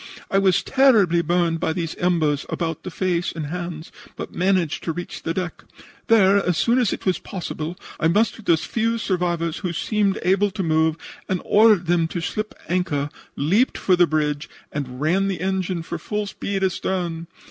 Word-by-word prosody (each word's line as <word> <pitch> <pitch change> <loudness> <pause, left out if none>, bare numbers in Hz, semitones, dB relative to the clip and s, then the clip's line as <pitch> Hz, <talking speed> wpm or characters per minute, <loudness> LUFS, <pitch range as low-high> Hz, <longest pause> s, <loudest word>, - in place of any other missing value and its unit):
I 195 - +4
was 190 -1 +3
terribly 220 -11 +4
burned 170 0 +1
by 160 - 0
these 165 -1 -3
embers 160 -5 +1
about 165 -3 -3
the - - -6
face 175 -1 -1
and 160 -2 -5
hands, 170 0 -5 0.2
but - - -7
managed 180 -4 +1
to 165 - 0
reach 175 +2 -6
the 165 - -2
deck. 180 0 -4 0.4
Then, 200 -3 +5
as 180 -4 0
soon 240 +7 +3
as 235 -6 +2
it - - -5
was 185 -2 +1
possible, 175 -2 -5 0.2
I 160 - +3
mustered 215 +4 +1
the 170 - +4
few 230 +7 -1
survivors 175 -5 -1
who 180 -3 -2
seemed 205 +3 0
able 195 +3 +3
to 195 0 -4
move, 160 -1 +2 0.3
ordered 205 +1 +4
them 170 -1 +2
to 175 - -4
slip 215 +6 -3
the - - -12
anchor, 150 -6 0 0.2
leaped 195 - +2
for 185 - +3
the 175 -1 +4
bridge 150 -2 -1 0.2
and 130 -4 -5
ran 180 +7 +2
the 195 -2 -2
engine 185 -2 -1
for 170 0 -5
full 210 +5 -3
speed 195 0 -3
astern. 175 -3 -2
175 Hz, 180 wpm, -22 LUFS, 165-195 Hz, 0.4 s, Then